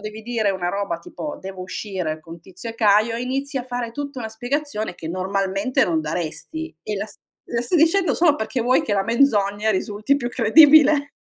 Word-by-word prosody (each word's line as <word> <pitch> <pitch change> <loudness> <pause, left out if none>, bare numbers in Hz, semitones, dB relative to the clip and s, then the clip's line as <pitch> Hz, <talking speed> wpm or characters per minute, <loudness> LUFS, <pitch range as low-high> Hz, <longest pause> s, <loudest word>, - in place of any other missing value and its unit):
devi 215 +1 -8
dire 225 -3 0
una 185 -2 -2
roba 200 -3 -2
tipo: 295 - -7
"Devo 190 -1 -7
uscire 185 -4 -4
con 165 +1 -11
Tizio 190 +6 -9
e - - -10
Caio", 215 +1 +3
e 240 - -3
inizi 275 +2 -3
a 245 - -5
fare 245 -2 -4
tutta 285 0 -6
una 220 - -4
spiegazione 240 - -3
che 160 - -8
normalmente 195 - 0
non 165 -2 0
daresti, 175 - -5
e 215 - -4
la 205 - -3
s - - -15 0.3
la 235 -1 -1
stai 340 +9 0
dicendo 330 -1 +3
solo 315 -4 +3
perché 225 +3 -3
vuoi 250 +2 +3
che 205 - -1
la 195 - +2
menzogna 220 -4 +2
risulti 210 +7 0
più 240 -3 -3
credibile. 290 +4 +6
220 Hz, 200 wpm, -22 LUFS, 195-270 Hz, 0.3 s, credibile